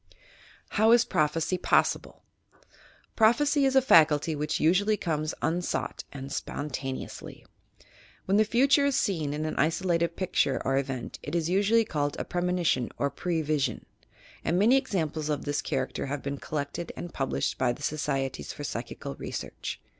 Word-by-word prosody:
HOW 220 +1 +3
IS 240 0 +5
PEOPHECY 160 +4 0
POSSIBLE - - +1
t - - -37 0.6
Prophecy 280 +6 +4
is 265 0 +2
a 265 - +6
faculty 160 - +5
which 150 +1 -1
usually 200 +7 +3
comes 155 -3 -2
unsought 175 +2 -2
and 135 0 -7
spontaneously. 135 -2 -5 0.8
When 195 +2 +2
the 215 - +6
future 270 +6 +3
is 280 - +1
seen 160 -9 0
in 150 +1 -3
an 155 - -3
isolated 170 +2 +1
picture 170 -7 +1
or 135 +1 +2
event, 135 -2 -5
it 145 - -5
is 165 -1 0
usually 210 +4 +3
called 145 -5 -1
a - - -3
premoni 180 0 -1
tion 130 -6 +2
or 140 0 0
pre 170 -3 -2
vis 145 -3 +1
ion, 115 - -9 0.6
and 175 - +1
many 220 +7 +5
examples 160 - -1
of 150 -2 -2
this 145 0 -1
character 135 -1 -2
have 140 0 -4
been 140 0 -4
collected 150 +3 -4
and 175 - -7
published 135 -1 -1
by 125 - +2
the 135 +5 -8
Societies 135 - -2
for - - -8
Psychical - - -5
Research. - - -6
160 Hz, 160 wpm, -28 LUFS, 145-190 Hz, 0.8 s, a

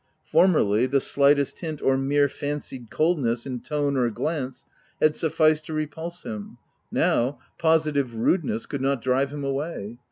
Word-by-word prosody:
Formerly, 125 - +4
the 140 +1 +2
slightest 140 +1 +2
hint, 160 -4 -5
or 135 - +2
mere 140 +2 +2
fancied 140 -4 -5
coldness 140 -8 +1
in 130 -3 -4
tone 145 0 -1
or 125 -2 +2
glance, 130 +2 -3 0.3
had 155 0 +3
sufficed 155 -1 +2
to 160 - -5
repulse 160 +3 -4
him: 105 -2 -7 0.3
now, 125 +4 +1 0.2
positive 155 -6 +2
rudeness 115 - 0
could 140 - -5
not 135 -2 0
drive 130 +2 +2
him 145 -1 -5
away. 135 -5 -4
140 Hz, 150 wpm, -25 LUFS, 125-155 Hz, 0.3 s, Formerly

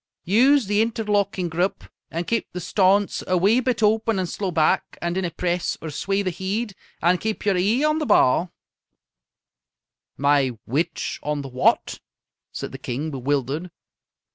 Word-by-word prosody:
"Use 255 - +4
the 205 +2 +2
interlocking 205 -5 0
grup 175 +4 -1 0.3
and 170 +2 -3
keep 230 +3 -2
the 180 - -4
staunce 195 +3 +2
a 185 - +2
wee 205 +7 +4
bit 255 -3 -1
open 220 0 +2
and 185 -1 -1
slow 195 +3 -3
back, 160 -3 +1
and 170 0 -2
dinna 185 -1 -1
press 175 +1 -2
or 160 - -6
sway 195 +7 -1
the 185 - -1
heid 200 +5 -3 0.3
and 175 +1 +3
keep 220 -1 -3
yer 200 -2 +3
e'e 210 +9 +2
on 305 +1 +2
the 305 - -2
ba'." 165 +8 +4 1.7
"My 140 -4 +2
which 160 +7 -2
on 150 -1 -2
the 135 - -7
what?" 125 0 +1 0.5
said - - -6
the - - -8
King, 140 +6 -4
bewildered. 140 +5 -2
185 Hz, 160 wpm, -23 LUFS, 160-210 Hz, 1.7 s, Use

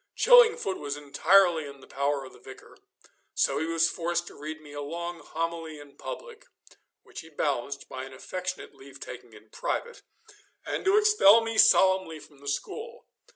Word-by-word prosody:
Chillingfoot 470 - +5
was 145 0 -4
entirely 160 +3 +3
in 140 -1 -11
the - - -15
power 140 0 -2
of 130 - -13
the - - -17
Vicar, 130 - -14 0.6
so 140 +1 +1
he 160 - -2
was 165 0 +2
forced 170 +1 -2
to - - -11
read 155 +2 -7
me 150 -2 -14
a 145 - -5
long 170 +4 -5
homily 165 -2 -5
in 145 -1 -15
public - - -9 0.6
which - - -11
he 160 - -15
balanced 140 -3 -3
by 130 0 -7
an 135 - -12
affectionate 185 +7 -6
leave 135 0 -14
taking - - -10
in - - -17
private 480 0 -4 0.6
and - - -4
to 390 +2 +4
expel 420 - +6
me 225 0 -4
solemnly 190 -6 +4
from 145 -1 -17
the 140 - -13
school. 445 - -5
165 Hz, 175 wpm, -27 LUFS, 145-195 Hz, 0.6 s, expel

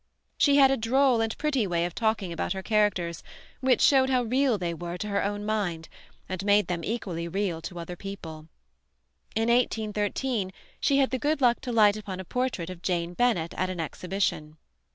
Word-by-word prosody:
She 285 -1 +4
had 270 -2 +6
a 270 - +2
droll 250 +1 +3
and 225 0 -2
pretty 275 -8 0
way 170 -1 0
of 175 - -4
talking 220 -5 -1
about 165 - -2
her 190 0 -6
characters 195 -6 +1 0.4
which 260 -1 +2
showed 265 -2 +5
how 255 -2 +2
real 255 0 +2
they 175 -3 -2
were 175 +1 -5
to 210 - -4
her 200 0 0
own 205 +1 -2
mind, 190 -7 -2 0.4
and 185 0 -4
made 205 +1 +4
them 175 -2 -3
equally 185 -7 -3
real 180 -2 -2
to 175 - -7
other 170 +1 -6
people. 165 -5 -8 0.9
In 225 +1 +1
1813 220 -2 0 0.3
she 275 - +2
had 270 -1 +3
the 260 - -1
good 300 +2 0
luck 245 -3 +3
to 250 - -4
light 215 -2 +5
upon 195 -3 -6
a 190 - -6
portrait 245 -7 -2
of 175 -2 -10
Jane 175 -1 -1
Bennet 180 -7 +1
at 185 0 -1
an 185 -2 -5
exhibition. 160 -1 -2
205 Hz, 195 wpm, -27 LUFS, 175-240 Hz, 0.9 s, had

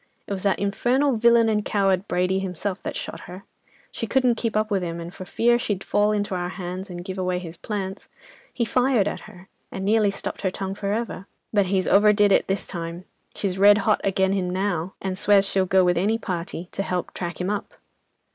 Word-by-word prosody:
It - - -10
was 190 - -4
that 200 0 +1
infernal 245 +7 +1
villain 235 0 +5
and 210 -1 +1
coward, 195 -2 +1
Brady 180 +2 +1
himself, 190 +1 -3
that - - -5
shot - - -5
her. 185 +2 -9 0.5
She - - -4
couldn't 255 -2 +3
keep 225 -2 -2
up 215 0 0
with 195 -2 +1
him, 170 -1 -4
and 170 +1 -7
for 185 - -8
fear 240 +5 +2
she'd 205 -5 -2
fall 205 +1 +2
into 205 -2 -1
our 175 -1 -2
hands, 185 +1 -6
and 175 -1 -7
give 190 -1 -5
away 180 -1 0
his 175 -2 -7
'plants,' 195 0 -5 0.4
he 235 - -1
fired 245 -2 +2
at - - -3
her, 185 +1 -15 0.2
and 190 0 -4
nearly 215 0 +3
stopped 200 - -5
her 190 - +1
tongue 190 +1 -4
for 200 0 -3
ever. 215 -3 -3 0.3
But 200 -3 +3
he's 190 0 0
overdid 205 0 +5
it - - +3
this 195 0 -1
time—she's 180 +2 -6
red 205 +1 +7
hot 215 - +3
agen 190 0 +1
'im 185 -2 -1
now, 185 -2 -2
and 190 -1 -3
swears 200 -1 +4
she'll 190 -1 +1
go 190 +1 +4
with 175 -1 +2
any 215 +5 +1
party 180 -4 -5
to - - -3
help 180 -2 -3
track 170 -3 -5
him 180 +2 -1
up." 210 0 -4
195 Hz, 215 wpm, -24 LUFS, 185-210 Hz, 0.5 s, red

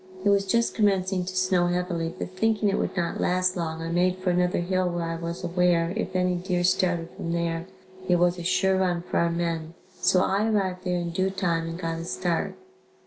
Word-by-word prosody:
It - - +5
was 200 -1 +3
just 235 +4 +2
commencing 190 -3 +1
to 185 +1 -6
snow 185 -1 +2
heavily 175 -2 -1
but - - -5
thinking 210 +2 +1
it 195 - 0
would - - -2
not 170 -1 -1
last 185 0 +1
long, 165 -2 -3
I 165 - -4
made 180 +2 +2
for 185 -1 0
another 180 0 +1
hill 185 0 0
where 175 -1 -2
I 165 0 -3
was 170 +2 -5
aware, 175 -1 +2
if 190 -4 -3
any 180 0 +2
deer 180 0 -1
started 175 -2 +1
from 165 - -3
there 170 0 -2 0.4
it 180 - +5
was 175 0 +2
a - - -5
sure 190 +2 +2
run 175 -2 0
for - - -2
our 170 - +2
men, 170 -1 -2 0.2
so 185 0 +4
I 200 +3 +1
arrived 190 -3 -1
there 180 -1 0
in 175 -1 -3
due 190 +2 0
time 175 -4 -1
and 165 - -5
got 165 -2 -3
a 165 - -5
start. 175 -1 -1
180 Hz, 220 wpm, -26 LUFS, 170-185 Hz, 0.4 s, It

